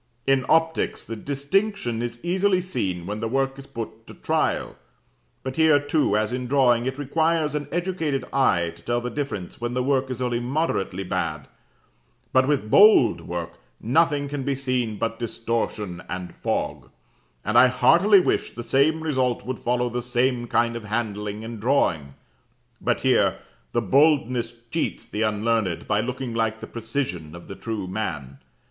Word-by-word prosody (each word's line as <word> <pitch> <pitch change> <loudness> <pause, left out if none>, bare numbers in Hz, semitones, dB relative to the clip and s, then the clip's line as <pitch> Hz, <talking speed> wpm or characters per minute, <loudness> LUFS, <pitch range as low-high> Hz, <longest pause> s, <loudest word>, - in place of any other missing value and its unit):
In 135 -2 +2
optics 160 +1 +1
the 115 - -5
distinction 140 - -1
is 120 0 -4
easily 185 +2 +2
seen 100 - -3
when 105 +3 -4
the 115 - -2
work 135 +2 -1
is 135 - -11
put 115 -1 -7
to - - -11
trial; - - -1 0.7
but 130 +2 -5
here 160 -2 +5
too, 145 -6 +1
as 110 +2 0
in 125 0 -3
drawing, 125 -3 +3
it 130 +1 -3
requires 155 +2 +1
an 150 -1 -3
educated 170 -5 -1
eye 85 -11 +2
to - - -18
tell 120 0 0
the 120 0 -4
difference 115 -10 -5
when 120 +1 -2
the 125 - +1
work 135 0 +1
is 130 -2 -4
only 120 -2 0
moderately 120 - -1
bad; 85 -6 -3 0.9
but 130 0 +4
with 135 -7 0
"bold" 200 - +6
work, 85 -1 -5 0.2
nothing 145 +3 +2
can 145 0 -4
be 140 +1 -1
seen 125 -5 -1
but 115 +1 -2
distortion 115 -5 -3
and 90 0 -5
fog: - - -3 0.6
and 105 - -1
I 125 +2 +8
heartily 190 - +5
wish 180 - 0
the 120 - -5
same 140 +7 +2
result 130 -8 0
would 130 0 -4
follow 125 0 0
the 120 0 -3
same 120 0 0
kind 120 0 +1
of 115 -2 -6
handling 105 -1 -3
in 115 0 -7
drawing; 85 - +1 0.7
but - - 0
here, - - +3 0.3
the 120 - 0
boldness 125 - +2
cheats 165 - -2
the 105 - -4
unlearned 110 -4 0
by 105 - +2
looking 125 0 -4
like 110 -1 0
the - - -7
precision 110 - -4
of 85 - -11
the - - -7
true 110 -1 -4
man. 75 -9 -4
120 Hz, 165 wpm, -24 LUFS, 110-140 Hz, 0.9 s, I